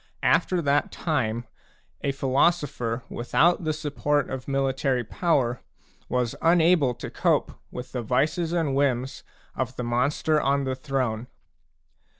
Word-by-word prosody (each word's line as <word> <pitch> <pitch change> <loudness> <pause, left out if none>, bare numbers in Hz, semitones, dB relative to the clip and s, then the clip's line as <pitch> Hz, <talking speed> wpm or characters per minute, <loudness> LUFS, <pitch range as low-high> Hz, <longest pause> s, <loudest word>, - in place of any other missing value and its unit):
After 180 -2 +2
that 145 0 +1
time, 120 -8 -1 0.6
a 140 - +1
philo 135 +2 +3
sopher 130 -8 -4
without 165 +8 +2
the 155 - +1
support 145 -1 -1
of 130 -1 -5
military 135 -2 0
power 125 - 0 0.5
was 125 -2 0
unable 165 -6 +4
to - - -7
cope - - +1 0.2
with 125 0 -8
the 125 - -3
vices 150 - 0
and 165 -5 0
whims 135 -1 0 0.3
of 130 0 -3
the 125 - -4
monster 140 +6 +1
on 140 0 +1
the 130 -1 -1
throne. 130 -4 -2
135 Hz, 135 wpm, -25 LUFS, 125-150 Hz, 0.6 s, unable